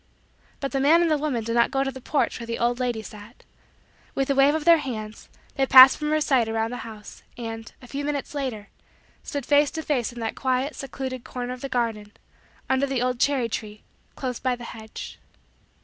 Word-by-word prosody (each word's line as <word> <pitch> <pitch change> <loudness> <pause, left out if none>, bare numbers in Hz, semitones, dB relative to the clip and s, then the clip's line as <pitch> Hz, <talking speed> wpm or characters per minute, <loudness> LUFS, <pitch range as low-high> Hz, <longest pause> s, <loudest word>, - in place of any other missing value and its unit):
But 275 - -3
the 275 - 0
man 320 +5 +5
and 335 - +1
the 305 - +3
woman 275 -6 -1
did 230 +1 -3
not 235 0 +4
go 270 0 0
to 270 - -2
the 260 0 -10
porch 285 +1 0
where 235 - -7
the 230 - -3
old 240 +1 0
lady 240 -3 -1
sat. 210 +3 -12 0.7
With 275 0 0
a - - +4
wave 275 +2 +4
of 310 -1 -3
their 335 -1 +7
hands, 220 -6 -6 0.2
they 270 -1 +1
passed 260 0 +10
from 300 0 -3
her 310 0 +2
sight 255 -6 +2
around 225 +1 -1
the 245 - -4
house, 215 -3 -10 0.2
and, 225 -1 -6
a - - -11
few 280 +3 -4
minutes 290 -1 -3
later, 255 -8 -4 0.5
stood 285 -3 -5
face 290 0 +4
to 320 - -5
face 255 -7 -1
in 240 - -10
that 225 -1 -2
quiet, 260 +2 -1
secluded, 260 -2 -6
corner 250 0 -5
of 255 - -10
the 275 - -4
garden, 225 -4 -2 0.5
under 265 +1 +1
the 265 -2 -1
old 250 -1 -1
cherry 270 -4 +2
tree, 215 -1 -6 0.3
close 250 -3 -4
by 255 -1 0
the 245 - -11
hedge. 220 -1 -9
255 Hz, 215 wpm, -25 LUFS, 230-275 Hz, 0.7 s, passed